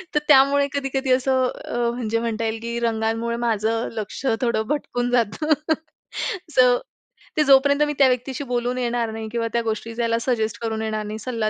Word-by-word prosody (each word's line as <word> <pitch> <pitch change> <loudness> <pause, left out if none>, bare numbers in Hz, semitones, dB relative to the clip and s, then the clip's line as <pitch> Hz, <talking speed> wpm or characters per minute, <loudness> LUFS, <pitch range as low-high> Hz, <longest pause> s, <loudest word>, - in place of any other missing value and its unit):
तर - - +5
त्यामुळे 280 0 +5
कधी-कधी 270 -1 -1
असं 260 0 +2 0.2
अ, - - -4 0.2
म्हणजे 230 -2 -1
म्हणता 230 -1 -2
येईल, 225 0 -2
की 235 +1 -3
रंगांमुळे 225 0 -1
माझं 225 -1 0
लक्ष 215 +4 -6 0.2
थोडं 235 -3 +1
भटकून 245 -4 -1
जातं. 245 +6 +2 1.0
सो 250 -1 +6 0.6
ते 305 - +5
जोपर्यंत 280 +1 +5
मी 295 - -1
त्या 275 - +7
व्यक्तीशी 255 +2 -1
बोलून 245 0 -1
येणार 240 -2 -1
नाही 220 0 -5
किंवा 230 -1 -1
त्या 235 - +2
गोष्टी 225 0 -3
त्याला 230 -1 +1
सजेस्ट 220 -4 -1
करून 220 -1 -2
येणार 215 -1 -2
नाही, 215 +1 -5
सल्ला 230 -3 -2
235 Hz, 170 wpm, -23 LUFS, 225-260 Hz, 1.0 s, त्या